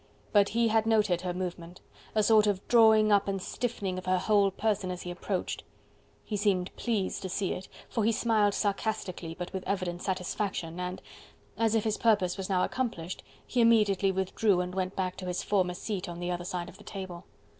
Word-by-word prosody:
But 205 -1 +5
he 230 0 +2
had 220 0 +2
noted 210 -6 +3
her 180 -1 -2
movement 175 -1 -5 0.4
a 215 - +4
sort 215 0 +5
of 200 -1 -1
drawing 220 -2 +6
up 200 -1 +4
and 195 -1 -1
stiffening 195 -3 -3
of 185 - -11
her 185 0 +3
whole 200 +1 +3
person 205 -1 -1
as 180 -1 -5
he 180 - -5
approached. 180 +1 -3 0.6
He 215 - -3
seemed 195 -3 0
pleased 215 -6 -1
to 190 - -4
see 190 +1 -1
it, 185 - -7 0.2
for 225 - -1
he 225 - +4
smiled 215 -3 +2
sarcastically 195 -5 -2
but 180 +1 -6
with 190 -1 -3
evident 185 -3 -2
satisfaction, 185 -2 -2
and 180 0 -4 0.5
as 225 -1 +2
if 220 - +2
his 215 -1 -1
purpose 205 -6 +3
was 195 -1 -5
now 185 -2 +2
accomplished 195 -9 -3 0.2
he 245 - +1
immediately 210 -4 +4
withdrew 190 +1 +1
and 180 0 -2
went 185 0 -2
back 185 -1 -2
to 185 - -6
his 180 0 -2
former 185 -3 +1
seat 195 -1 -4
on 170 0 -6
the 175 0 -2
other 175 0 -3
side 175 -1 -3
of 190 - -13
the - - -13
table. 185 -3 -7
195 Hz, 200 wpm, -29 LUFS, 180-215 Hz, 0.6 s, drawing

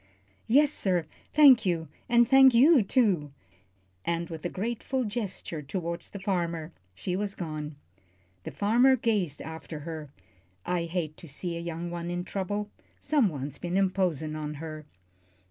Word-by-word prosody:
"Yes, 285 +5 +5
sir 180 - +1 0.3
thank 285 -5 +7
you; 170 -4 -1 0.2
and 235 0 +5
thank 265 -1 +7
you, 280 +3 +7
too," 195 - +1 0.7
and 170 0 -2
with 160 -2 -7
a 175 - -1
grateful 235 +6 -2
gesture 205 -7 -4
toward 170 +3 -4
the 200 - -7
farmer, 170 -4 -2 0.2
she 180 - -3
was 200 0 -2
gone. 155 -3 -5 0.7
The - - -5
farmer 240 +6 +4
gazed 210 - -1
after 160 -1 -7
her. 155 -1 -6 0.6
"I 175 -2 0
hate 165 -3 -3
to 170 - -12
see 170 +4 -5
a - - -4
young 170 0 -5
one 170 0 -4
in 175 0 -2
trouble. 205 +2 -3 0.3
Someone's 155 - 0
been 175 +1 -2
imposin' 180 -6 0
on 150 -1 -4
her." 155 0 -8
175 Hz, 145 wpm, -28 LUFS, 160-210 Hz, 0.7 s, thank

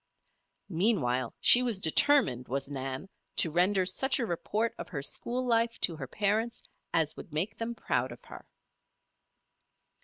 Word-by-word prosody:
Meanwhile 160 - +1
she 245 - +8
was 235 -6 0
determined, 160 - +3
was 135 +2 -2
Nan, 135 +4 -5 0.3
to 165 - +3
render 185 +3 +2
such 265 +9 +1
a 245 - -1
report 215 +5 -2
of - - -7
her 145 -7 -5
school 245 - 0
life 230 -1 0
to 170 - +1
her 135 -3 -6
parents 215 - -1 0.3
as 160 -2 +1
would - - -11
make 180 +8 -2
them 235 +1 -4
proud - - -2
of - - -13
her. - - -12
190 Hz, 150 wpm, -29 LUFS, 150-230 Hz, 0.3 s, she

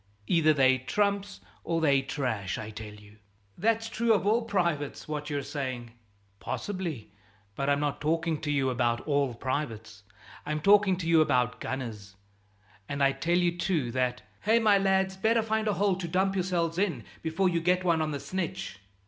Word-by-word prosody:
Either 155 +3 +4
they're 130 -3 +4
trumps 200 - -1 0.2
or 165 -1 0
they're 140 -4 +3
trash. 125 -9 -3
I 110 0 -6
tell 105 -1 -8
you 105 0 -17 0.2
" 100 -1 -38
"That's 225 0 +2
true 230 0 +2
of 200 -3 +1
all 220 +3 +3
privates, 170 -10 -1
what 150 -1 -4
you're 145 -2 -2
saying." 130 -5 -4 0.5
"Possibly; 175 - -4 0.4
but 140 +5 -2
I'm 140 0 +2
not 145 -1 -2
talking 160 0 0
to 150 - -3
you 135 -3 +1
about 120 -1 0
all 140 -4 0
privates; 115 -6 -4 0.4
I'm 150 +1 -2
talking 200 +1 +5
to 170 -2 -4
you 165 -1 +5
about 125 -5 +1
gunners, 110 -7 -5 0.7
and 140 0 -1
I 135 - +5
tell 170 +5 0
you 175 -1 +2
too 170 -8 -1
that 125 0 -1
" - - -35
"Hey, 220 +3 +3
my 215 -3 +4
lads! 190 -1 +1
Better 225 +3 +2
find 220 0 -1
a 210 - +2
hole 195 +1 +2
to 180 -3 -4
dump 190 +3 +1
yourselves 175 -3 -1
in, 200 -3 0 0.2
before 165 +4 0
you 170 -1 0
get 180 +2 +2
one 170 -3 +2
on 155 - 0
the 145 -2 -3
snitch!" 185 - -4
160 Hz, 185 wpm, -28 LUFS, 130-190 Hz, 0.7 s, talking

